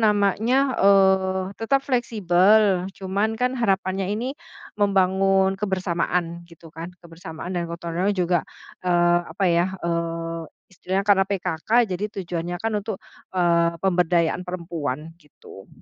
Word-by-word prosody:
namanya, 220 +6 +2
eee, 190 -1 +4 0.2
tetap 275 +4 +1
fleksibel. 205 -5 +3
Cuman 200 +4 -1
kan 250 +2 0
harapannya 195 -5 0
ini 235 +6 -2 0.5
membangun 195 0 +2
kebersamaan 175 -3 -1
gitu 165 -1 -15
kan, 165 +2 -7 0.2
kebersamaan 165 +1 -8
dan 170 -2 -2
gotong 170 0 -6
royong 195 +4 0
juga, 175 -2 +2 0.4
eee, 175 -1 +3
apa 185 +5 -2
ya, 180 +2 +1
eee, 165 0 -2 0.3
istilahnya 190 +2 -2
karena 195 -2 +4
PKK 180 -2 -4
jadi 190 0 -4
tujuannya 175 -2 -4
kan 225 +4 -3
untuk, 210 -1 -5 0.4
eee, 170 -1 +2
pemberdayaan 175 -2 +2
perempuan 165 -4 -5
gitu. 140 -9 -15
185 Hz, 120 wpm, -23 LUFS, 170-200 Hz, 0.5 s, eee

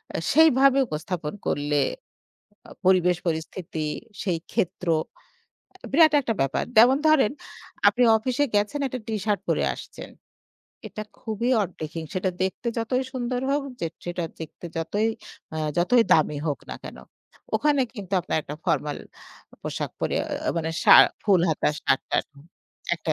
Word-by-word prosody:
আ - - 0
সেইভাবে 275 -3 +5
উপস্থাপন 155 +1 -4
করলে 145 0 0 0.9
আ - - -13
পরিবেশ 180 -2 +4
পরিস্থিতি 160 -1 -3 0.4
সেই 180 -5 0
ক্ষেত্র 180 0 -2 1.0
আ - - -7
বিরাট 315 +1 +6
একটা 230 -3 -1
ব্যাপার। 135 0 0
যেমন 250 +4 +7
ধরেন 290 -8 +4 0.6
আপনি 250 - +4
অফিসে 255 +5 0
গেছেন, 210 +8 +1
একটা 255 0 -5
টি-শার্ট 210 -1 -1
পরে - - +1
আসছেন। - - -10 0.8
এটা 215 - -6 0.2
খুবই 230 +2 -2
অড 195 - 0
ড্রেসিং 160 +1 -5
সেটা 185 0 0
দেখতে 190 +5 -2
যতই 250 +3 0
সুন্দর 250 -1 -2
হোক, 285 0 +1 0.2
যে 165 - 0 0.2
যেটা 175 -1 -3 0.2
দেখতে 160 +2 -8
যতই 205 +7 0 0.4
অ্যা 160 - -5 0.2
যতই 230 +7 +4
দামি 150 -2 +3
হোক 145 - -1
না - - -4
কেনো। - - -9 0.5
ওখানে 295 -2 +2
কিন্তু 200 -3 -9
আপনার 170 - -2
একটা 150 - -7
ফরমাল 150 -1 0 0.6
পোশাক - - -4
পরে - - -1
অ্যা - - -2
মানে 160 0 -1
শা - - +8 0.3
ফুল 195 -5 +4
হাতা 155 - +1
শার্ট-টার্ট - - 0 0.7
একটা 160 - -2
195 Hz, 145 wpm, -25 LUFS, 165-250 Hz, 1.0 s, শা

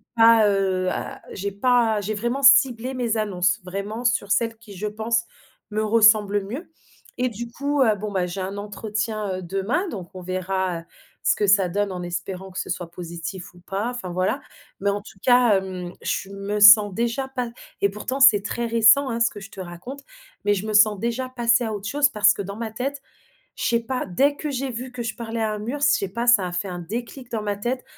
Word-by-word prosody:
Pas, 225 -2 +6
heu, 190 -2 +1
à - - -5
j'ai 200 +1 -4
pas 225 +1 +2
j'ai 210 +2 -3
vraiment 240 +6 -2
ciblé 265 -2 +5
mes 235 -3 -1
annonces 205 0 0
vraiment 200 +6 -5
sur 215 -4 +1
celles 230 -1 +1
qui, 220 -3 -13
je 210 +3 -3
pense, 230 +2 -1 0.5
me 215 +1 -1
ressemblent 210 -2 +4
mieux 280 - -7 0.5
et 250 - +1
du 235 0 -6
coup, 280 +2 -1
heu, 220 -4 +4
bon, 210 +1 -5
bah, 185 -2 +1
j'ai 180 +2 -6
un 190 +1 -4
entretien, 210 -1 -3
heu, - - -7
demain, 195 - -1
donc 185 - -7
on 185 - -8
verra 185 -1 -2 0.4
ce - - +2
que 205 - 0
ça 195 -2 +5
donne, 205 +2 -1
en 180 -1 -5
espérant 180 +2 -5
que 185 - -11
ce - - -5
soit 175 -1 -4
positif 170 +1 -7
ou 175 - -17
pas, 195 +5 -3
enfin, 245 -7 -6
voilà, 185 +2 0 0.4
mais 200 - +1
en 200 +1 -1
tout 195 -2 -15
cas, 245 -5 +5
hem, 185 -2 -5
je 195 - -2
me 200 +1 -4
sens 205 -1 +9
déjà 235 +5 -1
pa 250 -3 -4 0.3
et 200 - +3
pourtant, 230 +7 -4
c'est 215 -7 +7
très 235 +3 -3
récent, 230 +4 +5
hein, 230 0 -2
ce 230 - +3
que 205 - -10
je 195 - -10
te 195 - -11
raconte, 185 +10 -8 0.4
mais 205 - +4
je 200 +1 -3
me 215 - -3
sens 210 0 +5
déjà 235 +4 -2
passer 240 -1 +2
à 220 - -3
autre 205 0 -5
chose. 290 0 +3
Parce 210 -3 +4
que - - -5
dans 200 +1 -6
ma 225 -2 -4
tête 275 +5 -4 0.6
je - - -4
sais 235 -1 +2
pas, 255 +2 -3
dès 275 +11 +2
que 300 - -4
j'ai 270 -1 -3
vu 250 +2 -6
que 245 - -5
je 230 - -4
parlais 230 -1 -4
à 215 - 0
un 210 - -4
mur, 245 +7 -4
je - - +2
sais 195 - +2
pas, 235 +5 -3
ça 220 -6 +5
a - - -8
fait 180 +2 -3
un 180 - -5
déclic 235 +7 -6
dans 220 -2 -2
ma 205 -1 -2
tête, 245 +5 -3
215 Hz, 225 wpm, -23 LUFS, 195-235 Hz, 0.6 s, sens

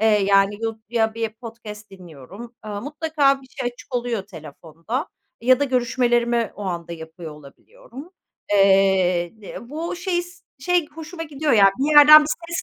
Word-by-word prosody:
eee, 220 - +2
yani, 200 -1 +3
yu 225 -1 -4
ya 225 -1 0
bir 225 -1 -2
podcast 215 -3 -11
dinliyorum. 185 - -13
Eee, 205 -1 -6
mutlaka 290 -1 0
bir - - -16
şey 245 -1 -5
açık 250 - -14
oluyor 240 -4 -2
telefonda 165 - -7 0.3
ya 255 +3 +3
da - - +3
görüşmelerimi 240 -2 0
o 205 - -9
anda 170 -2 -5
yapıyor 160 0 -10
olabiliyorum. 275 - -14 0.4
Eee, 190 -3 +3
di 200 - -10
bu 320 +8 -6
şey 350 -1 -2
s, 350 0 -15 0.2
şey 350 +3 0
hoşuma 325 +2 -9
gidiyor 300 -1 -2
ya, 200 -3 +6
bir 295 +3 0
yerden 305 +1 +10
bir 300 - -4 0.2
ses 340 - -3
235 Hz, 160 wpm, -21 LUFS, 195-290 Hz, 0.4 s, yerden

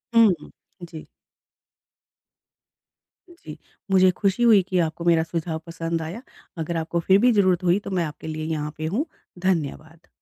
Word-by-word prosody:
हुँ, 225 -3 +7
हुँ। - - -13 0.3
जी। 160 -2 -9 2.2
जी, 160 - -11 0.3
मुझे 185 -1 +5
ख़ुशी 200 +3 +1
हुई 220 -5 +6
कि 185 - +1
आपको 160 +2 -6
मेरा 165 -2 +4
सुझाव 160 -1 -4
पसंद 165 0 -3
आया। 170 +9 -6 0.4
अगर 165 +1 -3
आपको 165 +1 -2
फ़िर 190 +4 +4
भी 250 - +6
ज़रूरत 185 -4 +2
हुई 180 +2 +3
तो 200 - -8
मैं - - +1
आपके 155 +1 -8
लिए 155 0 -4
यहाँ 150 -2 -3
पे 155 - -4
हूँ। 290 - 0 0.3
धन्यवाद। 165 -2 -3
170 Hz, 160 wpm, -23 LUFS, 160-190 Hz, 2.2 s, हुँ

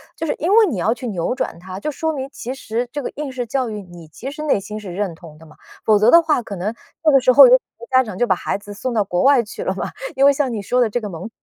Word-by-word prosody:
就 325 - -4
是 310 - 0
因 335 - -1
为 450 -1 +7
你 305 - -2
要 215 +6 +1
去 245 +1 -7
扭 195 +2 -2
转 260 -10 -4
她， 185 +1 -8
就 300 - -3
说 320 +2 -2
明 270 -2 -4
其 255 +1 -6
实 240 -1 -3
这 290 -1 -4
个 - - -4
应 290 -2 -5
试 250 -1 -4
教 255 +1 -1
育 210 -1 -5
你 175 -3 -13
其 250 - -8
实 300 - -8
内 290 -9 +2
心 210 +2 -7
是 195 -4 -8
认 200 -3 -2
同 160 -2 -14
的 160 - -16
嘛， 155 - -17 0.3
否 215 -2 +4
则 215 +3 +5
的 335 +6 +8
话， 310 -5 +1
可 215 -3 -7
能 195 +4 -3 0.3
那 310 - +5
个 275 - +6
时 255 0 +4
候 375 - +9
有 - - +6
很 - - +7 0.2
多 475 - -12
家 260 0 +5
长 215 -6 -8
就 245 - +2
把 190 - +2
孩 - - -3
子 205 0 -11
送 240 +5 -4
到 215 - +3
国 180 -2 -1
外 270 -3 +5
去 220 - -7
了 - - -2
嘛， - - -4 0.2
因 270 - +4
为 280 - +6
像 275 -2 -1
你 220 -3 -3
说 250 +5 +1
的 235 - +2
这 245 - -1
个 210 - -5
蒙 175 +3 -7
235 Hz, 345 characters per minute, -20 LUFS, 200-275 Hz, 0.3 s, 候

